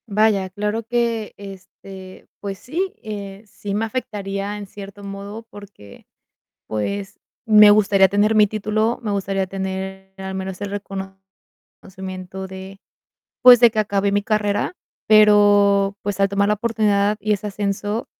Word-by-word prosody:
Vaya, 205 -2 +2
claro 210 +3 -3
que 230 -2 -1
este, 190 -1 -12
pues 195 -2 -6
sí, 365 +8 -3
eh, 200 -1 -7
sí 205 0 -7
me 220 +2 0
afectaría 205 -4 -4
en 205 - -7
cierto 200 +1 -11
modo, 200 +3 -7
porque, 200 - -14 0.6
pues, 195 - -4 0.3
me 210 -2 +7
gustaría 200 -2 +5
tener 205 +3 +2
mi 210 -1 +6
título, 215 +2 -1
me 215 - -3
gustaría 195 -1 -1
tener 190 0 -6
al 190 0 -6
menos 190 0 -5
el 205 -1 -4 0.9
reconocimiento, 190 0 -9
de 190 +1 -10 0.6
pues, 250 -1 +9
de 240 -2 +7
que 215 - -1
acabé 200 -1 0
mi 205 0 +1
carrera. 205 - -1 0.3
Pero, 205 -2 +5
pues, 200 -1 -3
al 195 0 +3
tomar 200 +1 +1
la - - +4
oportunidad 210 -2 +1
y 210 +1 -2
ese 210 +1 -3
ascenso, 205 +2 -3
200 Hz, 140 wpm, -21 LUFS, 195-210 Hz, 0.9 s, pues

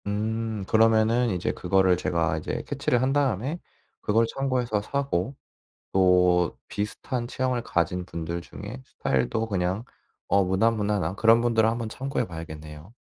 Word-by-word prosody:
음 110 0 -2
그러면은 115 +2 +4
이제 90 -3 -1
그거를 95 0 +2
제가 85 -3 0
이제 80 - -4
캐치를 120 - 0
한 130 +1 +1
다음에 140 - 0 0.4
그걸 115 +2 +3
참고해서 125 -3 -1
사고 135 -2 -2 0.6
또 90 -2 +4
비슷한 120 +4 -3
체형을 125 -1 -1
가진 90 -2 -1
분들 85 0 -4
중에 65 - -9
스타일도 65 - -1
그냥 95 +1 -1 0.4
어 100 +1 +4
무난무난한 100 -2 +1
그런 115 +2 +5
분들은 115 -2 +3
한번 115 0 -2
참고해 135 +5 -2
봐야겠네요. 80 +1 -9
105 Hz, 315 characters per minute, -26 LUFS, 90-115 Hz, 0.6 s, 그런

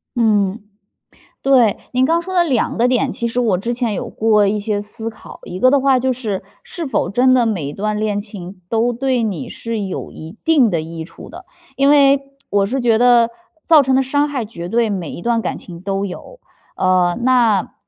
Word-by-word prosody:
嗯。 210 -3 +1 0.8
对， 250 -6 +4 0.2
您 255 +1 +3
刚 330 +4 +1
说 375 +2 -6
的 350 - +5
两 265 -9 0
个 235 +2 +3
点， 255 +1 +1
其 235 - -2
实 235 +2 -2
我 220 -7 +2
之 235 +6 -3
前 235 -4 -1
有 250 -2 -4
过 215 -2 +2
一 205 +1 0
些 205 0 -1
思 210 +2 -6
考， 225 - -13
一 180 - -7
个 255 +4 +5
的 280 - +4
话 270 -1 +3
就 260 +1 0
是 220 -6 -4 0.2
是 455 -9 -4
否 235 -9 -1
真 250 +6 +3
的 245 -2 +3
每 190 -9 -2
一 140 - -5
段 210 +3 -2
恋 210 -1 -1
情 190 -3 -9
都 235 +2 +1
对 255 0 0
你 200 -8 -3
是 230 -1 -5
有 195 -2 -5
一 160 +7 -11
定 295 -8 +4
的 170 -4 -1
益 165 +1 -7
处 165 - -12
的。 - - -11 0.3
因 275 +1 +3
为， 280 -1 +5 0.3
我 200 -1 +2
是 265 +6 -2
觉 240 -3 +3
得 235 0 +4 0.3
造 320 -3 +6
成 265 -1 +1
的 265 - +3
伤 285 +3 +1
害， 270 -6 -3
绝 175 -5 -8
对 230 +1 +1
每 180 -6 -4
一 - - -7
段 235 -1 +1
感 - - -3
情 170 -2 -10
都 195 +1 -2
有。 350 - -9 0.4
呃， 180 -1 +2
那， 240 -6 +2
230 Hz, 230 characters per minute, -18 LUFS, 200-255 Hz, 0.8 s, 造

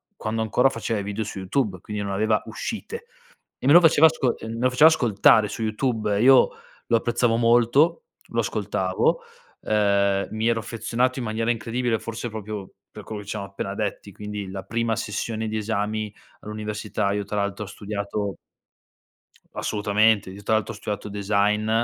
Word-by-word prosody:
quando 110 - -3
ancora 125 +5 +3
faceva 115 -3 -3
i - - -4
video 105 +2 -3
su 100 - -6
YouTube, 95 0 -1
quindi 105 -1 -5
non 100 - -3
aveva 105 +2 +2
uscite. 230 - -6 0.6
E - - -2
me 140 - +6
lo 175 - +10
faceva 160 -1 +6
asco 140 -6 -1
e - - -8
me 115 - -5
lo 125 +1 +3
faceva 150 +5 +7
ascoltare 110 -6 +4
su 115 - -5
YouTube. 110 -2 0
Io 130 +1 +7 0.4
lo 115 - +3
apprezzavo 120 0 +1
molto, 120 - +3 0.3
lo - - +1
ascoltavo, - - 0 0.4
uhm, 100 -2 +2
mi 110 +1 -2
ero 115 -1 +1
affezionato 120 +4 -1
in 120 - -3
maniera 115 +2 -1
incredibile 115 0 -1
forse 115 +2 -5
proprio 105 -2 -6 0.2
per - - -10
quello 105 -1 -6
che 100 - -12
c - - -3
amo 100 - -4
appena 100 0 -5
detti, 105 -1 -4
quindi 105 0 -6
la 95 0 -6
prima 115 +2 -1
sessione 110 +1 -3
di 110 - -3
esami 105 0 -2 0.3
all'università 105 -1 -3
io 100 0 -2
tra 105 +1 -5
l'altro 100 +1 -2
ho 95 - -10
studiato 100 -2 -4 1.2
Assolutamente, 105 -1 +2
io 100 +2 -10
tra 110 - +1
l'altro 110 -1 0
ho - - -10
studiato 105 0 -5
design, 105 +1 +1
110 Hz, 175 wpm, -24 LUFS, 100-115 Hz, 1.2 s, lo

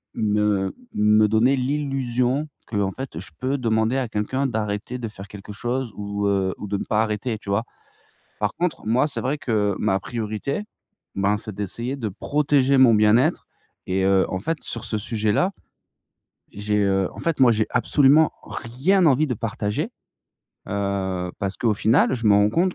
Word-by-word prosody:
me 105 -2 +1 0.2
me 105 0 +4
donner 110 +6 +3
l'illusion 135 0 -1 0.2
qu'en 100 -3 -1
fait 130 -8 -7
je 90 - -8
peux 135 +2 -1
demander 110 -1 +1
à 130 -3 -1
quelqu'un 130 +6 -1
d'arrêter 110 0 -3
de 120 -2 -4
faire 100 -2 -10
quelque 105 0 -9
chose 120 +2 -3
ou, 100 0 -3
heu, 95 -2 +1
ou 105 - -7
de 100 - -2
ne - - -3
pas 105 - 0
arrêter, 110 +1 -2
tu 105 - -11
vois? 100 +3 +1 0.8
Par 105 -1 -1
contre, 175 -8 -2
moi, 125 +7 +2
c'est 145 - -5
vrai 140 +4 -1
que, 105 -6 0
ma 95 - +1
priorité, 115 - -3 0.5
ben, 100 +1 +1
c'est 110 -1 -7
d'essayer 115 +7 -4
de 115 -6 -3
protéger 140 +5 +1
mon 125 -3 +7
bien-être. 105 +3 +3 0.4
Et 95 +1 0
heu, 95 0 +4
en 95 - -2
fait, 160 - -2
sur 115 - -5
ce 110 - -1
sujet-là, 110 - 0 1.0
j'ai, 105 +1 -1
heu, 95 -2 +1
en - - -10
fait, 165 -3 -1
moi, 130 -2 +6
j'ai 110 0 +1
absolument 145 +2 +4
rien 160 +11 0
envie 150 +1 +4
de 125 - -1
partager, 110 - -2 0.8
heu, 95 -2 -2
parce 100 0 -2
qu'au 115 -3 +1
final, 115 +6 +3
je 115 -3 -2
m'en 100 -1 +6
rends 105 +1 +3
compte 180 - +1
110 Hz, 175 wpm, -23 LUFS, 105-130 Hz, 1.0 s, mon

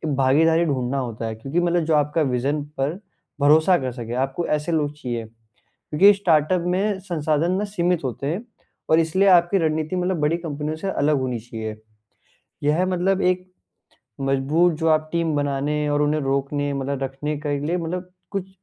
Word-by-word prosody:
भागीदारी 160 +5 +3
ढूँढ़ना 135 -3 -1
होता 115 -3 -4
है, 110 - -4
क्योंकि 135 +9 -2
मतलब 175 -1 +1
जो 160 -1 +2
आपका 150 +2 +1
विजन 140 +2 0
पर 145 +7 -1 0.4
भरोसा 155 +5 +5
कर 130 -2 -3
सके, 120 -1 -6
आपको 135 +6 -1
ऐसे 150 +2 -1
लोग 150 -3 0
चाहिए। 120 -6 -4 0.5
क्योंकि 195 +7 +4
स्टार्टअप 175 -2 +2
में 200 +1 0
संसाधन 165 -2 0
ना 195 +3 0
सीमित 180 -5 -1
होते 130 +1 -4
हैं 175 +10 -2 0.5
और 160 - +6
इसलिए 185 +5 +2
आपकी 180 +1 +5
रणनीति 155 +1 -1
मतलब 180 -1 -1
बड़ी 150 +3 +2
कंपनियों 155 -2 -4
से 195 +5 -3
अलग 150 -4 +1
होनी 125 -2 -2
चाहिए। 110 -1 -6 0.9
यह 155 +5 +2
मतलब 185 +1 +1
एक 185 0 0 0.7
मजबूत 135 +6 +2
जो 165 - 0
आप 155 0 +2
टीम 170 -2 0
बनाने 145 +1 -1
और 145 0 +1
उन्हें 150 +1 +1
रोकने 140 +1 -1
मतलब 140 0 -3
रखने 135 +3 -3
के 145 -1 0
लिए 170 +4 0
मतलब 180 +2 -4 0.2
कुछ 195 -2 -4
155 Hz, 170 wpm, -23 LUFS, 140-175 Hz, 0.9 s, और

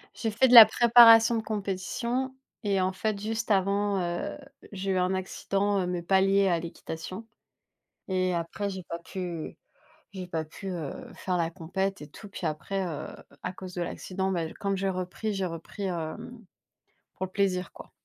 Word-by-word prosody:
J'ai 225 -2 -2
fait 245 +5 +4
de 250 - +3
la 230 -2 +14
préparation 230 0 +7
de 225 - 0
compétition 225 +6 -3 0.3
et 195 -2 +1
en 185 - +1
fait 200 +2 -2
juste 225 +1 -2
avant, 200 +1 +2
heu, 175 +7 -3 0.3
j'ai 195 0 -3
eu 190 - +1
un 180 +1 +1
accident, 195 +1 -1
heu, 180 - -2
mais 180 -1 -2
pas 190 +3 +3
lié 195 0 +3
à 170 -2 +2
l'équitation 170 +5 -7 0.8
et 185 -1 +1
après 170 +5 -3
j'ai 190 -1 -6
pas 170 - -4
pu 175 -2 -6 0.6
j'ai 185 -2 -6
pas 165 -2 -2
pu, 190 +5 -8
heu, 170 -5 -4 0.2
faire 180 -1 -2
la 165 -1 0
compète 190 +2 -3
et 150 - -8
tout 205 - -12
puis - - -6
après, 155 +6 -2
heu, 160 -5 -5 0.4
à 180 - -3
cause 185 -1 -9
de 175 - -4
l'accident, 190 +2 -3
bah, 165 -3 -2
comme 200 -1 -1
j'ai 195 +1 0
repris 185 +4 -3
j'ai 195 -1 -1
repris, 165 +4 -7
hem, 200 +7 -5 0.7
pour - - -4
le 185 - -17
plaisir, 190 -2 0
quoi. - - -13
190 Hz, 185 wpm, -28 LUFS, 180-205 Hz, 0.8 s, la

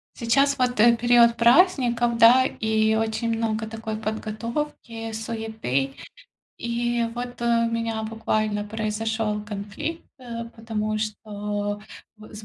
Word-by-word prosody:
Сейчас 275 +4 +2
вот, 250 -2 +1
э, 235 +1 +6
период 235 0 +5
праздников, 240 -3 +4
да, 245 +3 +7
и 220 -2 +1
очень 225 +1 -1
много 220 -1 -1
такой 220 0 -5
подготовки, 225 +2 -4
суеты. 220 - -3 0.6
И 235 0 -1
вот 245 0 -6
у - - -2 0.3
меня 230 -1 -2
буквально 215 -1 -1
произошёл 215 0 -2
конфликт, 205 +11 -5 0.2
э, 235 -2 -6
потому 215 -1 -2
что 205 -1 -3 0.4
б 215 0 -14
с 210 0 -9
225 Hz, 115 wpm, -24 LUFS, 215-235 Hz, 0.6 s, да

